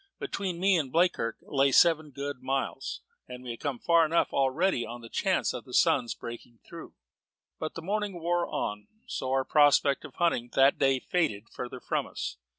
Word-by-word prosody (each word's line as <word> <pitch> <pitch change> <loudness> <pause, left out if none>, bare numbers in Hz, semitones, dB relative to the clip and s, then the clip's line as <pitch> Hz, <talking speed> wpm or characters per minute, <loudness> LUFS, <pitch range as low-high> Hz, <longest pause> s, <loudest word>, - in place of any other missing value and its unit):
Between 195 - -4
me 190 0 +4
and 140 -5 -2
Bleakirk 165 -9 +1
lay 140 0 +2
seven 160 +1 +4
good 140 -1 -6
miles, 135 +1 -3 0.3
and 125 0 -9
we 125 - -5
had 115 - -8
come 140 -4 -3
far 170 +5 +4
enough 160 +2 +1
already 135 +1 +1
on 120 +1 -8
the 115 - -11
chance - - 0
of - - -6
the - - -7
sun's 120 -2 +3
breaking 120 0 -9
through; - - -10 0.6
but 155 - -4
as - - -39
the 165 - -5
morning 205 -1 -2
wore 175 +1 0
on, 105 0 -4 0.2
so 130 - -4
our 135 0 +1
prospect 145 -1 +4
of - - -11
hunting 165 -9 0
that 135 +1 +4
day 135 -1 +3
faded 115 - -1
further 125 +1 -7
from - - -2
us. - - -5
140 Hz, 190 wpm, -28 LUFS, 125-170 Hz, 0.6 s, me